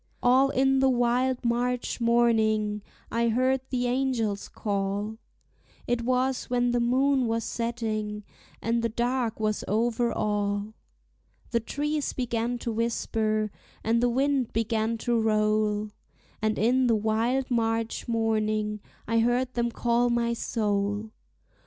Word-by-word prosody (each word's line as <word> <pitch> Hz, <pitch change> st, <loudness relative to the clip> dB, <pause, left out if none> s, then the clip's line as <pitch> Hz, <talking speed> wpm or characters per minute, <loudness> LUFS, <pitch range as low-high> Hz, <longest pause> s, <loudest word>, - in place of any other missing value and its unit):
All 260 Hz, +2 st, +5 dB
in 270 Hz, 0 st, +2 dB
the 265 Hz, 0 st, +4 dB
wild 250 Hz, +1 st, +1 dB
March 245 Hz, +1 st, 0 dB
morning 220 Hz, -3 st, +2 dB, 0.3 s
I 235 Hz, 0 st, +1 dB
heard 255 Hz, +3 st, +2 dB
the 250 Hz, -1 st, -1 dB
angels 245 Hz, -5 st, -1 dB
call, 205 Hz, +1 st, -2 dB, 0.7 s
It 240 Hz, 0 st, 0 dB
was 255 Hz, +2 st, 0 dB
when 245 Hz, 0 st, +2 dB
the 245 Hz, -, +1 dB
moon 260 Hz, +2 st, +2 dB
was 225 Hz, 0 st, -1 dB
setting, 215 Hz, -3 st, -3 dB, 0.4 s
and 230 Hz, +1 st, +1 dB
the 230 Hz, -, 0 dB
dark 240 Hz, 0 st, -1 dB
was 215 Hz, -1 st, -1 dB
over 235 Hz, +2 st, +1 dB
all; 205 Hz, 0 st, -1 dB, 0.8 s
The 235 Hz, -, +2 dB
trees 295 Hz, +5 st, -2 dB
began 240 Hz, -1 st, -1 dB
to 235 Hz, -, 0 dB
whisper, 220 Hz, -2 st, -1 dB, 0.3 s
and 230 Hz, +1 st, +2 dB
the 245 Hz, -, +3 dB
wind 270 Hz, 0 st, +1 dB
began 225 Hz, 0 st, 0 dB
to 240 Hz, -2 st, +2 dB
roll, 215 Hz, -1 st, +1 dB, 0.5 s
And 215 Hz, 0 st, 0 dB
in 250 Hz, +4 st, +3 dB
the 230 Hz, -, +4 dB
wild 225 Hz, +5 st, 0 dB
March 225 Hz, -1 st, 0 dB
morning 215 Hz, -2 st, 0 dB, 0.3 s
I 230 Hz, +1 st, +2 dB
heard 245 Hz, +2 st, +1 dB
them 235 Hz, 0 st, 0 dB
call 240 Hz, +1 st, +1 dB
my 235 Hz, 0 st, +1 dB
soul. 210 Hz, -2 st, -1 dB
230 Hz, 130 wpm, -27 LUFS, 215-245 Hz, 0.8 s, All